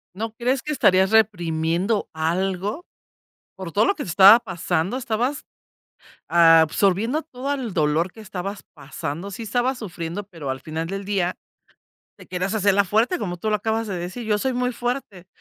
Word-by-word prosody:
¿No 225 +3 -4
crees 250 +2 0
que 300 - -4
estarías 190 -9 +4
reprimiendo 185 -1 +1
algo? 190 - -2 0.7
Por 190 -3 -7
todo 205 - +3
lo 395 - +2
que 290 - -5
te - - -7
estaba 195 +6 +8
pasando, 180 -2 -2
estabas 250 +2 -2 0.8
absorbiendo 180 - +4
todo 275 -2 -5
el 245 -8 -5
dolor 155 +3 +1
que 220 - -14
estabas 195 -1 -6
pasando. 150 +5 -6
Sí 225 +4 -7
estabas 245 +4 0
sufriendo, 175 -2 -5
pero 165 -8 -6
al 130 0 -4
final 160 +3 -5
del 195 +1 -5
día 190 -3 -1 0.8
te - - -14
querías 185 +3 -3
hacer 200 -2 +3
la 200 0 +4
fuerte, 225 - +1
como 180 -3 -4
tú 195 +5 -4
lo 210 - +2
acabas 225 +2 -2
de 195 -3 -4
decir. 180 +7 -5
Yo 210 -1 +1
soy 260 +5 -1
muy 250 0 0
fuerte, 240 -7 -4
200 Hz, 170 wpm, -23 LUFS, 175-230 Hz, 0.8 s, estaba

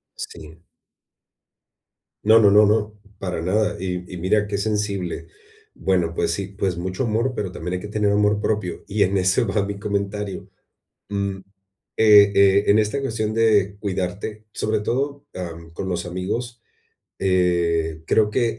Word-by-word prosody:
Sí. 80 +2 -10 1.6
No, 110 +2 +7
no, 105 -2 +6
no, 105 +1 +7
no, 105 0 +1 0.3
para 90 -4 -3
nada, 105 +4 0
y 90 -1 -3
y 90 - -6
mira 105 +4 +1
qué 100 -1 -2
sensible. 100 -3 -2 0.5
Bueno, 90 -3 0
pues, - - 0
sí, 100 +2 -3
pues, 95 -4 -1
mucho 95 +7 -3
amor, 115 +3 0
pero 95 -3 -3
también 90 0 -5
hay 90 - -3
que 105 - -7
tener 105 -1 0
amor 105 0 +2
propio, 105 -6 -2
y 105 0 +2
en 95 +1 +1
ese 95 +3 +2
va 100 -1 0
mi 100 0 -5
comentario, 100 0 -3 0.6
mm, 100 -1 -2 0.6
eh 105 -2 +7
eh, 100 0 +5
en 100 - +5
esta 110 +6 0
cuestión 110 -5 -2
de 105 -3 +2
cuidarte, 100 +2 -4
sobre 110 0 -1
todo, 140 +5 -2
am, 85 -2 -7
con 95 +3 -5
los 90 -1 -2
amigos, 115 +7 -4 0.6
eh, 85 -4 +1
creo 105 -1 +3
que 115 -1 0
100 Hz, 155 wpm, -22 LUFS, 90-105 Hz, 1.6 s, No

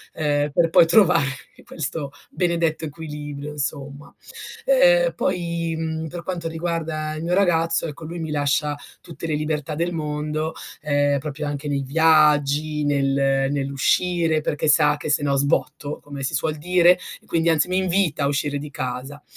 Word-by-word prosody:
ehm, 145 -2 0
per 165 +3 +2
poi 165 - +6
trovare 175 -4 +4 0.4
questo 150 -2 -5 0.2
benedetto 170 -3 -1
equilibrio, 150 -1 -7
insomma. 145 -1 -4 0.5
Ehm, - - +4
poi, 170 -2 -2
mhmm, 160 0 -3
per 170 +2 -7
quanto 170 -2 -4
riguarda 160 -2 -3
il 155 - -6
mio 175 +1 -1
ragazzo, 165 -4 +2
ecco, 160 0 -7
lui 170 +2 -6
mi 160 -2 -4
lascia 145 0 0 0.2
tutte 165 0 -8
le 155 - -1
libertà 150 0 -3
del 170 +3 -1
mondo, 155 0 -3 0.3
ehm, 145 -1 +1
proprio 150 +1 -5
anche 145 0 -4
nei 140 -1 -1
viaggi, 150 0 +3
nel 135 -1 +1
nell'uscire, 155 +4 +1
perché 150 0 -2
sa 150 -1 +5
che 150 - -6
se 150 - +4
no 140 -1 +1
sbotto, 145 +1 -1
come 140 -1 -8
si 135 +4 -2
suol 155 +1 -1
dire, 175 +2 +4 0.3
e - - -26
quindi 165 0 +1
anzi 160 +1 +4
mi 185 - 0
invita 185 -5 +1
a - - +2
uscire 145 0 -1
di 150 +1 -7
casa. 130 +2 -6
155 Hz, 160 wpm, -22 LUFS, 145-165 Hz, 0.5 s, poi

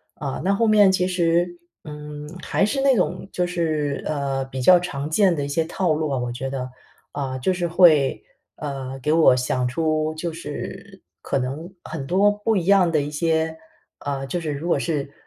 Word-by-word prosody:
啊， 140 -3 -4
那 195 +2 +2
后 225 +3 +2
面 210 -3 +6
其 180 -1 +1
实， 175 -1 +1 0.3
嗯， 150 0 -8 0.2
还 - - +1
是 270 +6 -1
那 275 0 +5
种 180 -3 -1
就 180 -1 -1
是， 155 -5 -1
呃， 140 -3 -1
比 130 -1 -6
较 180 +7 +7
常 150 -5 -4
见 190 +3 +3
的 145 - -2
一 - - -4
些 155 +3 0
套 170 0 0
路 155 0 -1
啊， 135 - -1
我 125 -1 -2
觉 130 +2 -4
得。 130 -1 -4 0.4
啊， 135 -2 -3
就 160 +9 0
是 175 -1 -1
会， 165 -5 +4 0.3
呃， 135 -3 -5
给 150 +4 0
我 160 -6 +6
想 125 0 0
出 155 +3 0
就 165 +1 -4
是 185 +5 -7 0.2
可 - - -1
能 140 +7 -4
很 155 -4 -6
多 195 +5 +4
不 210 +1 0
一 175 - -1
样 190 -3 +4
的 155 - +2
一 145 +1 -4
些 160 +1 0 0.4
呃， 140 -1 -3
就 175 +5 -3
是 155 -2 -3
如 145 +4 -4
果 175 - +2
是 145 -4 -2
155 Hz, 210 characters per minute, -23 LUFS, 140-180 Hz, 0.4 s, 较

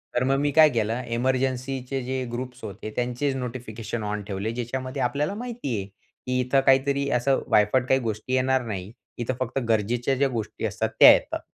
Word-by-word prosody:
तर 120 - +2
मग 135 +1 +2
मी 145 +1 +1
काय 155 +1 +7
केलं 115 -1 -1
एमर्जन्सी 130 +2 -1
चे 135 -1 -2
जे 130 +1 -2
ग्रुप्स 125 0 -6
होते 110 0 -6
त्यांचे 125 +3 -1
नोटिफिकेशन 120 -3 -5
ऑन 105 0 -3
ठेवले 100 +2 -3
ज्याच्यामध्ये 130 +3 -4
आपल्याला 140 +8 0
माहिती 230 - -4
आहे, 100 - -3
की 125 +5 -6
इथं 130 +2 +2
काहीतरी 140 +1 +3
असं 135 +3 +1
वायफट 105 +5 +4
काही 130 - +4
गोष्टी 110 +2 -3
येणार 130 0 +2
नाही, 100 -3 -5 0.3
इथं 120 +2 -2
फक्त 130 +1 -1
गरजेच्या 120 +4 +1
ज्या 140 +2 +2
गोष्टी 115 -4 -4
असतात - - -1
त्या - - +11
येतात. - - -1
125 Hz, 180 wpm, -25 LUFS, 115-135 Hz, 0.3 s, त्या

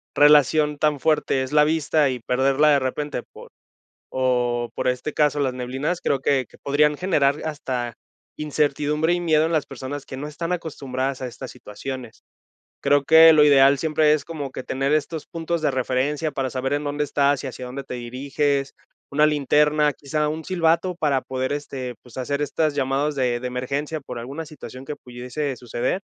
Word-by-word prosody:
relación 150 +1 +5
tan 150 -1 +1
fuerte, 150 -3 +1
es 130 - -6
la 150 0 +6
vista 155 -2 +2
y 125 - -4
perderla 135 +5 +2
de 140 -1 +5
repente 135 +1 -3
por - - -13 0.6
o 125 -2 0
por - - -2
este 125 +4 -1
caso, 150 -1 +2
las 135 -3 0
neblinas, 130 +7 -3
creo 140 - +1
que 135 -3 +1
que - - -18
podrían 150 +1 +2
generar 150 -6 +1
hasta 125 -6 -3 0.4
incertidumbre 150 +2 0
y 175 - 0
miedo 160 -2 +3
en 165 - -2
las 155 -3 +1
personas 135 +2 -6
que 130 - -7
no 145 - -5
están 165 +3 -5
acostumbradas 135 -5 -3
a 130 - -3
estas 125 +1 -8
situaciones. 125 +1 -8 0.6
Creo 145 0 +3
que 160 +1 +8
lo 150 -1 +6
ideal 140 -1 +6
siempre 155 -1 +3
es 155 - +1
como 150 -5 -5
que - - -6
tener 135 +3 -1
estos 155 +1 -1
puntos 165 0 -3
de - - +2
referencia 135 +4 -1
para 135 -2 -2
saber 135 +2 -2
en 145 +1 -2
dónde 145 +1 -2
estás 145 -1 +1
y - - -5
hacia 125 - -8
dónde 135 +2 -6
te 130 - -7
diriges, 135 +3 -2 0.4
una 150 +2 +3
linterna, 150 0 +3
quizá 150 +1 -2
un 155 +1 -4
silbato 175 0 +1
para 145 -6 0
poder 130 +1 -3
este, 130 -4 -5
pues, 125 -1 -16
hacer 140 +3 -2
estas 150 +1 0
llamadas 140 +2 0
de 125 -2 0
de 125 - -4
emergencia 140 +5 -3
por 125 -3 -7
alguna 140 +7 -6
situación 135 -4 -10
que 150 - -6
pudiese 125 +3 -5
suceder. 125 - -2
145 Hz, 185 wpm, -23 LUFS, 130-150 Hz, 0.6 s, que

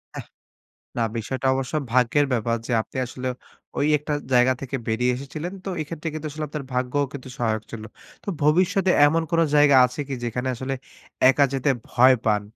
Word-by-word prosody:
আহ - - -6 0.7
না 115 - +2
বিষয়টা 130 +4 -3
অবশ্য 135 +2 -3 0.2
ভাগ্যের 125 +4 +3
ব্যাপার 115 0 0
যে - - -4
আপনি - - -10
আসলে 125 +1 -6 0.5
ওই 145 - +2
একটা 150 +1 -4 0.2
জায়গা 125 +1 +5
থেকে 135 0 -4
বেরিয়ে 125 +3 +1
এসেছিলেন। 155 +7 -6
তো - - -3
এক্ষেত্রে 160 +1 -6
কিন্তু 155 0 -5
আসলে 155 0 -4
আপনার 150 -1 -5
ভাগ্যও 130 +3 0
কিন্তু 130 -2 -8
সহায়ক 110 -2 -1
ছিল। 115 -2 -7 0.4
তো - - -24 0.2
ভবিষ্যতে 180 +5 +3 0.2
এমন 165 +3 +1
কোন 165 - +2 0.2
জায়গা 145 -1 +6
আছে 125 +3 -7
কি? 140 - -4
যেখানে 125 +2 -3
আসলে 130 +2 -4 0.6
একা 140 +1 +4
যেতে 135 +2 0 0.2
ভয় 130 +1 +6
পান? 105 -2 +2
130 Hz, 175 wpm, -23 LUFS, 125-150 Hz, 0.7 s, জায়গা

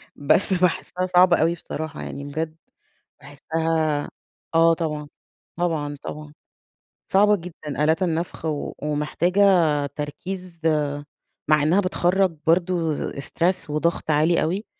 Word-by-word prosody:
بس 160 +7 +2
باحسها 180 0 0
صعبة 180 -1 +5
أوي 165 +2 +3
بصراحة، 160 -1 -6
يعني 140 - -6
بجد 155 +2 -4 0.7
باحسها 155 +1 -1 0.5
آه 165 0 +6
طبعًا، 150 -3 -3 0.5
طبعًا، 155 -4 -1
طبعًا 150 0 -8 0.8
صعبة 205 +2 +5
جدًا 155 -5 -5
آلات 160 +4 +2
النفخ، 170 0 -2 0.4
ومحتاجة 150 +6 0 0.5
تركيز 175 +4 -5 0.9
مع 150 -1 +4
إنها 165 +6 +3
بتخرج 185 -2 +1
برضه 170 -2 +1
stress 170 +4 0
وضغط 155 +2 0
عالي 155 +3 +3
أوي، 185 +8 -1
165 Hz, 105 wpm, -23 LUFS, 150-180 Hz, 0.9 s, آه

